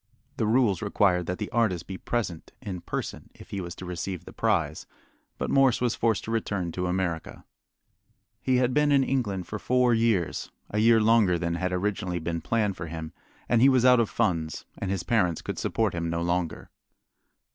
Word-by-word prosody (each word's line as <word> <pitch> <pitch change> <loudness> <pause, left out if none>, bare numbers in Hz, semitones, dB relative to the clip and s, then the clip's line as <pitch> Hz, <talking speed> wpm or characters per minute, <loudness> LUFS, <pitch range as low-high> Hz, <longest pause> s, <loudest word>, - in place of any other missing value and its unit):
The 110 -5 0
rules 110 -6 +3
required 95 -4 +2
that 90 - -2
the 105 - -5
artist 105 -8 +1
be 95 - -6
present 95 -6 -3
in 95 -4 -6
person - - -5
if - - -15
he 100 - -3
was 85 -1 -6
to 95 - -8
receive 90 0 -5
the - - -11
prize, 85 -9 0 0.5
but - - -2
Morse 135 -3 +4
was 120 -2 +1
forced 115 -3 0
to 110 - -5
return 100 -6 -1
to 90 +2 -2
America. 90 -3 -3 1.0
He 130 - +1
had 125 0 +2
been 150 +1 +3
in 140 -1 +5
England 105 -9 -1
for 105 - -5
four 125 +1 +3
years 115 -7 +1 0.2
a 105 - 0
year 115 +1 +5
longer 110 -5 +4
than 85 0 -2
had 90 +2 -1
originally 90 -1 -1
been 85 0 -3
planned 105 +2 0
for 85 - -5
him 80 -1 -6 0.3
and 120 -1 +3
he 135 - +7
was 130 -2 +3
out 125 -1 +7
of 115 - +2
funds, 80 -3 -1
and 100 - -4
his 95 -2 -1
parents 90 -8 +1
could - - -4
support 110 -4 0
him 85 -1 -2
no 85 0 -1
longer. 85 -1 -2
100 Hz, 195 wpm, -27 LUFS, 85-115 Hz, 1.0 s, he